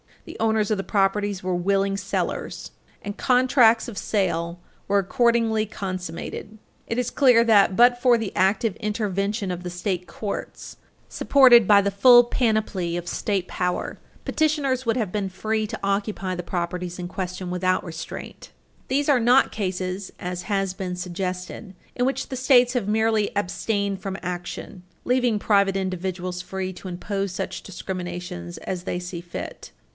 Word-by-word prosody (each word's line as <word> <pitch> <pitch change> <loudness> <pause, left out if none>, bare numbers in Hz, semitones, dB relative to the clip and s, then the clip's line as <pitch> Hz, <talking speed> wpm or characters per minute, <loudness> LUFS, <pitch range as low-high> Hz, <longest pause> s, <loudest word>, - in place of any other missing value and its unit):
The - - -9
owners 220 -1 +1
of 215 - +2
the 195 - -3
properties 200 -1 0
were 185 -1 0
willing 195 +2 +1
sellers, - - -3 0.3
and 205 0 -5
contracts 250 -3 +4
of 225 -5 -8
sale 170 -4 -1 0.3
were 200 - +2
accordingly 230 0 +2
consummated. 185 +2 -6 0.3
It 230 - -2
is 250 -1 -1
clear 250 -5 +5
that, 205 -4 +4
but 245 +3 +5
for 245 -2 +5
the 225 -4 -4
active 195 +2 +2
intervention 205 -1 -2
of 180 0 -4
the 180 - -4
state 180 0 -3
courts, 205 -2 -6 0.3
supported 245 -6 +6
by 205 -1 +7
the 200 0 0
full 240 +5 +7
panoply 215 -8 0
of 175 0 -6
state 190 0 -1
power, 180 -1 -2 0.3
petitioners 290 -5 0
would 230 +1 +1
have 215 -7 -1
been 200 -1 -2
free 215 +3 -2
to 220 +1 -6
occupy 195 -1 -1
the 175 - -5
properties 175 0 -3
in 180 -1 -5
question 185 -1 -5
without 185 +1 +1
restraint. 165 -1 -8 0.4
These 280 +3 0
are 275 -3 +5
not 245 +3 +4
cases, 185 -1 -3
as 180 0 -4
has 195 -1 -1
been 185 -2 -4
suggested, 185 +2 -5 0.2
in 245 - +1
which 270 +1 -2
the 260 - -4
States 250 -1 +4
have 240 -6 -1
merely 220 0 +1
abstained 200 0 -1
from 195 0 -4
action, 180 +2 -6 0.2
leaving 245 -3 +2
private 200 -2 +2
individuals 185 -1 -3
free 185 +1 -4
to 185 - -10
impose 195 +2 -3
such 180 - -4
discriminations 175 - -6
as 180 -2 -5
they 180 - -2
see 180 -1 -6
fit. 175 0 -8
195 Hz, 155 wpm, -24 LUFS, 180-225 Hz, 0.4 s, by